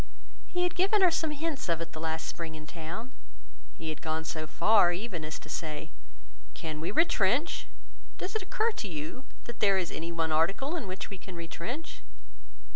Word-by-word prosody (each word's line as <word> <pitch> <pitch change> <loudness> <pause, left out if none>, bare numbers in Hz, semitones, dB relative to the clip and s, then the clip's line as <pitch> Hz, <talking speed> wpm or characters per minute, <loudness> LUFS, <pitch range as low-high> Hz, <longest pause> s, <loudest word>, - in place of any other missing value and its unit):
He 360 0 +1
had 355 - +2
given 390 +2 +4
her 360 - +8
some 320 -1 +1
hints 300 - -2
of 165 -1 +3
it 165 0 -5
the 155 - -5
last 160 0 -1
spring 165 -2 -4
in 155 0 -8
town; 170 +10 -5 0.7
he 160 - -4
had 155 -1 -4
gone 160 0 -1
so 155 -1 -2
far 175 +4 +6
even 180 -2 -3
as 155 +1 -3
to - - -12
say, 155 -1 -3 0.6
"Can 155 -1 -4
we 165 - -1
retrench? 255 - +3 0.5
Does 380 - -4
it 440 - +2
occur 435 +4 +2
to 210 - -2
you 160 - -5 0.2
that 235 - -7
there 200 -2 +5
is 180 -3 0
any 165 +1 -3
one 165 -1 +1
article 195 - +3
in 265 - -2
which 190 +2 -4
we 195 - -6
can 185 -1 -8
retrench?" 170 - -5
180 Hz, 195 wpm, -31 LUFS, -, 0.7 s, her